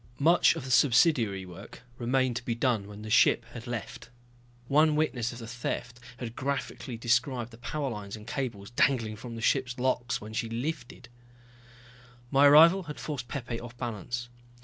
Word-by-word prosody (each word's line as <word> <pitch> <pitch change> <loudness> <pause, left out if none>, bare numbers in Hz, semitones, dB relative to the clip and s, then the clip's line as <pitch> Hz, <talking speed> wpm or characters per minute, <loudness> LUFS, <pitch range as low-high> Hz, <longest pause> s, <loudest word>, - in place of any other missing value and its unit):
Much 170 +5 +4
of - - -6
the 130 - -5
subsidiary 120 - +3
work 95 +7 -12 0.2
remained 130 0 +1
to 120 - -4
be 120 -1 -2
done 115 -4 0
when 105 +1 -10
the 110 - -7
ship 120 +1 +4
had 115 -1 -8
left. 120 0 -6 0.6
One 150 +2 +4
witness 130 -6 0
of 120 - -9
the 115 - -8
theft 125 0 -5 0.2
had 115 -2 -6
graphically 130 -3 -4
described 120 +1 0
the 115 - -14
power 145 +3 -3
lines 105 -2 -6
and 105 -1 -11
cables 115 -6 -4
dangling 120 -3 +1
from 115 +2 -8
the 115 - -6
ship's 130 -1 +1
locks 125 -1 0
when 110 +1 -9
she 115 +1 -2
lifted. 125 +1 -5 1.2
My 140 +1 +6
arrival 165 +6 +7
had 150 - -6
forced 140 -6 -5
Pepe 120 -3 -4
off 120 0 -10
balance. 120 +1 -4
120 Hz, 170 wpm, -29 LUFS, 115-135 Hz, 1.2 s, arrival